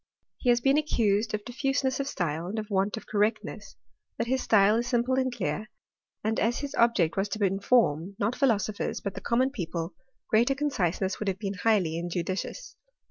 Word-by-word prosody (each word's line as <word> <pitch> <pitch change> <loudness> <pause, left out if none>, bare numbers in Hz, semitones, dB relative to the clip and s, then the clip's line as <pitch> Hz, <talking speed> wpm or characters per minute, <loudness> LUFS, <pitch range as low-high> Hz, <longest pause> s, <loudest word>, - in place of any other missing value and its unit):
He 250 - 0
has 240 0 +4
been 275 +4 +4
accused 215 -7 +1
of 210 - -6
difiuseness 270 +1 -1
of 275 - -1
style, 170 - -2
and 205 +4 -4
of 215 0 -4
want 200 +3 +1
of - - -8
correctness; 210 +1 -1 0.4
but - - 0
his 260 +2 0
style 210 0 +4
is 240 +1 -1
simple 245 +1 +1
and 260 -1 0
clear; 215 -1 -3 0.5
and 220 +1 0
as 235 +2 +1
his 285 0 -5
object 195 - +2
was 195 +1 0
to 210 0 0
inform, 195 -3 +2
not 215 +5 0
philosophers, 215 -6 0
but 200 - -4
the 195 - -7
common 250 +5 +1
people, 170 - -4 0.3
greater 235 +5 +3
con 295 +1 -1
ciseness 190 -2 -1
would 210 - -3
have 190 -1 0
been 200 -1 -3
highly 185 -5 +1
injudicious. 185 - -4
215 Hz, 190 wpm, -28 LUFS, 195-245 Hz, 0.5 s, has